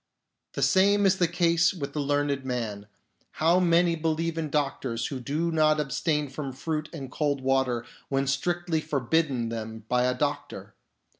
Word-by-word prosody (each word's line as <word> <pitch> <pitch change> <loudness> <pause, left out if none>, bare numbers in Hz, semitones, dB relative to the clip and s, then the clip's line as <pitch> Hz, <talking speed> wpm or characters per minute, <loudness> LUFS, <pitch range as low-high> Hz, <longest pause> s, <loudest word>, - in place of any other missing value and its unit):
The - - -1
same 200 +1 +4
is 190 0 +4
the 175 - +3
case 170 0 +2
with 140 -6 -5
the 150 - -2
learned 145 -1 0
man. 115 -5 -4 0.5
How 170 +3 +3
many 170 -1 +3
believe 165 +1 -1
in 160 -2 -3
doctors 135 -5 -1
who 135 - -4
do 155 +7 -1
not 155 -1 +3
abstain 150 +1 0
from 135 0 -6
fruit 155 +3 -3
and 135 -6 -7
cold 145 -2 -1
water 130 -3 +1 0.2
when 135 0 +1
strictly 165 +4 0
forbidden 140 -4 0
them 110 -1 -6
by 125 0 +2
a 125 0 0
doctor 145 +1 -3
150 Hz, 160 wpm, -27 LUFS, 130-165 Hz, 0.5 s, same